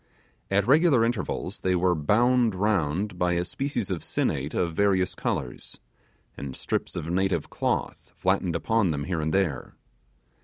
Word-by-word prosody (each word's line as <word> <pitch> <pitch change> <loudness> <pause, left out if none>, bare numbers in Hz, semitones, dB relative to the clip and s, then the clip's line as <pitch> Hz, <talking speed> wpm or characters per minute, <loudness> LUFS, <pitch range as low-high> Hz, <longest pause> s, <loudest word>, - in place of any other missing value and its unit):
At 100 0 +2
regular 140 -3 +5
intervals 120 -1 -3
they 95 -1 +1
were 90 0 +3
bound 115 +7 +2
round 95 -1 0
by 90 0 +2
a 85 0 0
species 130 -4 -2
of 90 - -2
sinnate 70 +3 -1
of 85 -2 0
various 95 0 +2
colours, - - -4 0.6
and 70 -2 -6
strips - - -3
of - - -4
native 95 +3 0
cloth - - -2
flattened 95 -2 +1
upon 110 +2 +1
them 70 -2 -2
here 85 0 -2
and 80 0 -1
there. 85 -8 -1
95 Hz, 150 wpm, -26 LUFS, 85-105 Hz, 0.6 s, regular